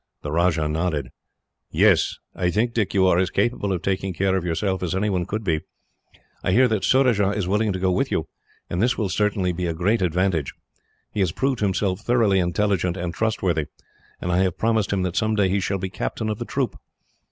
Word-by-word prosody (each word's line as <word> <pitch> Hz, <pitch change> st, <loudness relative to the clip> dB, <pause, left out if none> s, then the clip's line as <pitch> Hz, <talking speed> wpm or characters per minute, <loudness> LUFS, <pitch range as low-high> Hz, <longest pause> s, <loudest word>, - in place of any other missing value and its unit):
The 75 Hz, -, -4 dB
Rajah 80 Hz, -1 st, +2 dB
nodded. 75 Hz, -4 st, -1 dB, 0.6 s
"Yes. -, -, +3 dB, 0.2 s
I 90 Hz, -2 st, 0 dB
think, 115 Hz, +6 st, 0 dB
Dick, 110 Hz, -5 st, -1 dB
you 95 Hz, -1 st, +4 dB
are 90 Hz, -1 st, +4 dB
as 95 Hz, -, +1 dB
capable 100 Hz, -1 st, 0 dB
of 90 Hz, -1 st, -2 dB
taking 95 Hz, -1 st, -1 dB
care 95 Hz, +2 st, +1 dB
of 95 Hz, -, -1 dB
yourself 95 Hz, +3 st, -1 dB
as 90 Hz, -1 st, -2 dB
anyone 95 Hz, -3 st, 0 dB
could 110 Hz, +2 st, -3 dB
be. 80 Hz, -5 st, 0 dB, 0.8 s
I 90 Hz, -, +1 dB
hear 125 Hz, +4 st, +5 dB
that 110 Hz, -4 st, 0 dB
Surajah 125 Hz, -7 st, +3 dB
is 100 Hz, -3 st, -2 dB
willing 105 Hz, +2 st, +1 dB
to 95 Hz, -, -2 dB
go 95 Hz, 0 st, +1 dB
with 90 Hz, -, 0 dB
you, -, -, -1 dB, 0.4 s
and 90 Hz, -, -2 dB
this 120 Hz, +2 st, +2 dB
will 105 Hz, -4 st, -1 dB
certainly 100 Hz, -2 st, +1 dB
be 90 Hz, +1 st, -2 dB
a 85 Hz, -, -2 dB
great 100 Hz, +7 st, +1 dB
advantage. 90 Hz, -4 st, 0 dB, 0.6 s
He 105 Hz, -, -4 dB
has 95 Hz, -4 st, +2 dB
proved 135 Hz, +5 st, -1 dB
himself 95 Hz, -2 st, 0 dB
thoroughly 115 Hz, -5 st, +3 dB
intelligent 90 Hz, 0 st, 0 dB
and 85 Hz, -1 st, -3 dB
trustworthy, 90 Hz, -8 st, 0 dB, 0.5 s
and 90 Hz, -, -2 dB
I 90 Hz, -, +2 dB
have 95 Hz, -2 st, +1 dB
promised 110 Hz, -2 st, +1 dB
him 95 Hz, -2 st, 0 dB
that 90 Hz, -2 st, -2 dB
someday 110 Hz, -3 st, +2 dB
he 100 Hz, +2 st, +1 dB
shall 100 Hz, +1 st, -1 dB
be 95 Hz, 0 st, -4 dB
captain 110 Hz, +3 st, -3 dB
of 105 Hz, -, -3 dB
the -, -, -4 dB
troop. -, -, -2 dB
95 Hz, 210 wpm, -23 LUFS, 90-105 Hz, 0.8 s, hear